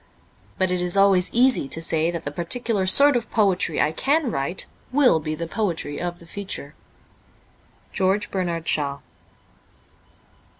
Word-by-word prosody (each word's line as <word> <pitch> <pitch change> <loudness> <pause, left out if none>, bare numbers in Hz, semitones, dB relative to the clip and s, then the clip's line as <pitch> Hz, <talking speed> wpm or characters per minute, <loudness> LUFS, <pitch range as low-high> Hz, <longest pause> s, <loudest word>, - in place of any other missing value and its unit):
But 185 -1 0
it 180 -1 -1
is 180 +2 -2
always 195 -2 +4
easy 250 - +2
to 160 - -4
say 165 0 0
that 170 -1 -5
the 145 - -3
particular 190 +5 -2
sort 280 +8 +7
of 240 -1 -2
poetry 190 -7 +1
I 150 - +2
can 280 - 0
write 140 +5 -2 0.3
will 255 - +4
be 155 0 -4
the 170 +2 -5
poetry 165 -6 -3
of 175 0 -4
the 170 - -16
future. 165 -5 -7 0.7
' - - -34
George 195 +2 0
Bernard 170 -4 -3
Shaw.'' 140 -3 0
180 Hz, 155 wpm, -22 LUFS, 165-205 Hz, 0.7 s, sort